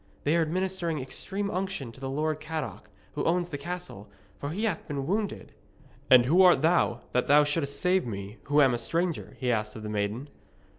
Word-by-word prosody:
'They 150 +3 +2
are 170 - +3
administering 175 -1 -1
extreme 195 +10 -3
unction 185 -9 -3
to 125 - -14
the 135 -1 -4
Lord 155 +2 -1
Cadoc, 155 -9 -5 0.2
who 145 - -2
owns 175 +1 +1
the 145 - -4
castle, 175 - -7 0.3
for 145 - -4
he 190 +8 -3
hath 210 -7 -1
been 140 -2 -3
wounded.' 205 +5 -2 0.6
'And 125 -2 +8
who 170 +8 +5
art 180 -6 +6
thou, 160 -7 +2
that 125 - +1
thou 150 +1 +6
shouldst 145 -1 0
save 185 -4 +2
me 100 0 -6
who 145 +1 +4
am 130 -2 +4
a 120 - -1
stranger?' 170 +5 -2
he 125 -2 0
asked 105 -2 -1
of 110 - -8
the 105 - -5
maiden. 105 +6 -2
150 Hz, 200 wpm, -28 LUFS, 125-180 Hz, 0.6 s, And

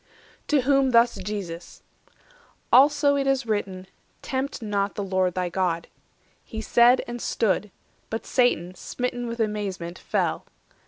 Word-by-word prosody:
'" - - -30
To 295 -3 +3
whom 270 0 +3
thus 235 -1 +4
Jesus: 185 -4 -6 0.9
"Also 285 +2 +5
it 275 -1 0
is 270 -2 +1
written, 195 -4 -3 0.4
560 - - -11
'Tempt 265 0 -3
not 200 -1 -1
the 205 - -3
Lord 185 -2 0
thy 180 -1 -1
God.'" 175 -2 -1 0.5
He 220 - -7
said, 240 +3 +4
and 240 0 -6
stood; 210 -1 0 0.4
But 225 - -4
Satan, 215 -9 +1
smitten 245 +5 -4
with 235 0 -5
amazement, 200 -5 -3
fell. - - -1
220 Hz, 145 wpm, -25 LUFS, 185-250 Hz, 0.9 s, Also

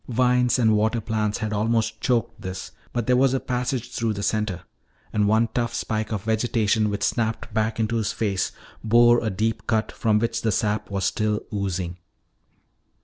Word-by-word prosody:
Vines 125 0 +2
and 110 -3 +4
water 110 +3 +1
plants 110 -2 -1
had 110 -1 -3
almost 110 +1 0
choked 120 -3 0
this, 95 0 -6 0.2
but 120 -2 -2
there 125 - +3
was 135 +1 +3
a - - +1
passage 125 -1 -2
through 115 -3 -1
the 100 0 -5
center. 105 -5 -1 0.5
And 105 -1 +2
one 110 +2 +3
tough 120 -1 -1
spike 110 -1 -2
of 105 -3 -2
vegetation 110 -1 +1
which 100 0 -2
snapped 110 -1 -1
back 110 +1 0
into 115 +1 0
his 110 -3 0
face 100 -4 -1 0.3
bore 120 +2 +5
a 110 - 0
deep 110 +3 -2
cut 110 -1 +1
from 110 -2 +1
which 115 +1 -1
the 110 - +1
sap 105 0 0
was 100 -1 -1
still 105 -1 0
oozing. 95 -3 -2
110 Hz, 180 wpm, -24 LUFS, 105-115 Hz, 0.5 s, bore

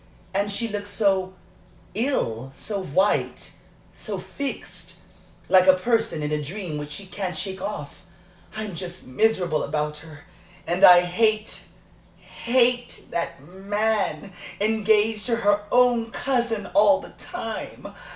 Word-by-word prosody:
And 200 +1 0
she 230 +3 -1
looks 205 -1 -5
so 195 -3 +1 0.6
ill 135 - -1
so 205 -2 -4
white, 190 +5 0 0.4
so - - -4
fixed 280 -1 -6 0.5
like 185 0 +5
a 185 - +8
person 225 -4 0
in 150 - -2
a 150 0 0
dream 165 0 -5
which 150 0 -6
she 150 +7 -7
can't 185 -2 -4
shake 190 +1 -3
off. 200 -8 -6 0.5
I'm 215 -2 -4
just 175 +1 -7
miserable 175 +3 +1
about 150 0 -2
her. 155 -1 -13 0.4
And 175 +2 -1
I 180 -1 +10
hate, 215 +5 0 0.5
hate 245 0 0
that 170 -5 -3
man 200 +2 -1 0.3
engaged 215 +1 +2
to 235 - +2
her 205 -2 +2
own 245 -2 +4
cousin 235 -4 -1
all 215 +8 +6
the - - -11
time!" 225 -12 -6
200 Hz, 130 wpm, -24 LUFS, 175-225 Hz, 0.6 s, I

